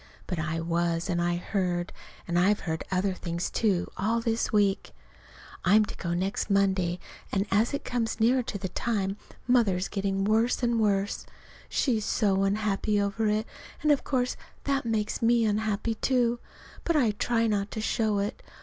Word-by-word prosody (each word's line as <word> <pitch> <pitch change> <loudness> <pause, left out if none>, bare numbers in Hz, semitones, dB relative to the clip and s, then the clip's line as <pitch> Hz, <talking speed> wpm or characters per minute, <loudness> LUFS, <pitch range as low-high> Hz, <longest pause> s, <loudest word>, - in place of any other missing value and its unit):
But 180 -4 -3
I 160 +1 -2
was, 170 +1 0
and 175 0 0
I 175 0 +1
heard. 175 -1 -2 0.3
And 175 0 +1
I've 200 +4 +3
heard 160 -2 -3
other 190 +1 +1
things, 170 -1 -3
too, 195 -6 +1
all 225 +4 +1
this 230 0 -1
week. 205 -3 +1 0.7
I'm 210 +3 +5
to - - -8
go 170 -1 -3
next 190 +4 -1
Monday, 190 -3 +2 0.3
and 195 0 +1
as 215 +4 +3
it - - -6
comes 235 -2 -1
nearer 245 +4 +4
the 200 -5 -4
time 195 -1 -1 0.3
Mother's 210 -7 +3
getting 195 -1 -1
worse 225 +4 +2
and 235 -1 +2
worse. 200 -1 0 0.4
She's 230 -6 +1
so 195 -2 +1
unhappy 205 +1 +1
over 205 +2 0
it. 215 +1 +1 0.4
And 305 - +4
of 285 - +2
course 250 -2 0 0.3
that 275 -2 0
makes 220 -2 -1
me 230 0 +4
unhappy, 215 +1 0
too. 240 0 +1 0.4
But 335 - +1
I 250 -8 +4
try 230 +2 0
not 205 -2 0
to 220 - -5
show 215 -1 0
it. 200 +1 -2
205 Hz, 170 wpm, -28 LUFS, 190-225 Hz, 0.7 s, I'm